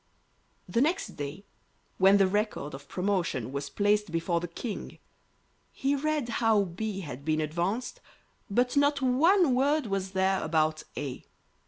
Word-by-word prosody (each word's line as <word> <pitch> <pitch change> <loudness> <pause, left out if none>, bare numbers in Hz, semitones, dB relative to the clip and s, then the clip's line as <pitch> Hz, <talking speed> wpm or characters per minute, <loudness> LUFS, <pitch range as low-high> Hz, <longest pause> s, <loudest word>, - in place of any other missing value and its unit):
The 235 - +1
next 360 +7 +1
day, 145 +7 -7 0.5
when 195 +2 +6
the 195 - +5
record 205 -7 -1
of 140 +1 -9
promotions 180 - -1
was 140 0 -3
placed 205 -2 +1
before 165 +1 0
the 175 - -4
King, 205 +6 -6 0.7
he 275 +1 0
read 300 -2 -1
how 220 -3 +4
B 195 +2 -4
had 140 -5 -7
been 155 +1 0
advanced, 175 +10 -2 0.5
but 245 +6 +1
not 285 -1 +3
one 310 +5 +4
word 285 +3 +2
was 195 -2 -3
there 190 0 +1
about 155 -1 +1 0.2
A. 135 -3 -5
195 Hz, 145 wpm, -28 LUFS, 165-250 Hz, 0.7 s, when